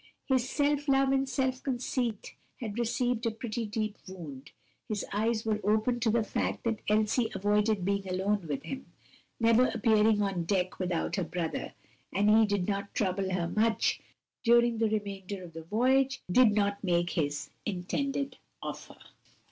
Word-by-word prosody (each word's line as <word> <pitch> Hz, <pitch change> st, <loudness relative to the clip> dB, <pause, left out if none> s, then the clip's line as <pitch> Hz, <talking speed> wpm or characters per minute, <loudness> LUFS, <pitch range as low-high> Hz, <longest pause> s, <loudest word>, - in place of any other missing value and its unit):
His 260 Hz, -2 st, +1 dB
self 290 Hz, 0 st, +1 dB
love 270 Hz, 0 st, +4 dB
and 270 Hz, 0 st, +1 dB
self 260 Hz, 0 st, 0 dB
conceit 245 Hz, -4 st, -2 dB, 0.3 s
had 225 Hz, -2 st, -4 dB
received 240 Hz, 0 st, 0 dB
a -, -, +3 dB
pretty 225 Hz, 0 st, -4 dB
deep 215 Hz, 0 st, -3 dB
wound, 150 Hz, -8 st, -9 dB, 0.4 s
his 210 Hz, -3 st, -2 dB
eyes 220 Hz, +2 st, 0 dB
were 215 Hz, -1 st, +1 dB
opened 220 Hz, +4 st, +1 dB
to 225 Hz, -, +2 dB
the 225 Hz, +1 st, +2 dB
fact -, -, -2 dB
that 225 Hz, -2 st, -1 dB
Elsie 215 Hz, +2 st, +2 dB
avoided 205 Hz, 0 st, +1 dB
being 200 Hz, -1 st, -1 dB
alone 190 Hz, 0 st, 0 dB
with 145 Hz, -2 st, -3 dB
him, 270 Hz, 0 st, -6 dB, 0.5 s
never 230 Hz, +2 st, +5 dB
appearing 220 Hz, -1 st, +3 dB
on 190 Hz, -4 st, -1 dB
deck 185 Hz, 0 st, 0 dB
without 180 Hz, +1 st, -1 dB
her 190 Hz, -, +1 dB
brother, 170 Hz, -1 st, -3 dB, 0.4 s
and 205 Hz, +3 st, +3 dB
he 220 Hz, 0 st, +6 dB
did 200 Hz, -3 st, 0 dB
not 200 Hz, -1 st, -3 dB
trouble 190 Hz, -1 st, 0 dB
her 180 Hz, -2 st, 0 dB
much 220 Hz, +5 st, +1 dB, 0.4 s
during 235 Hz, -1 st, +4 dB
the 225 Hz, -1 st, +2 dB
remainder 200 Hz, -2 st, -4 dB
of 170 Hz, -2 st, -11 dB
the 165 Hz, -, -7 dB
voyage, 255 Hz, +9 st, +2 dB
did 245 Hz, +2 st, +6 dB
not 200 Hz, -1 st, 0 dB
make 175 Hz, -2 st, +1 dB
his 145 Hz, -4 st, -2 dB, 0.2 s
intended 275 Hz, +9 st, -2 dB, 0.2 s
offer. -, -, -7 dB
215 Hz, 160 wpm, -30 LUFS, 195-240 Hz, 0.5 s, he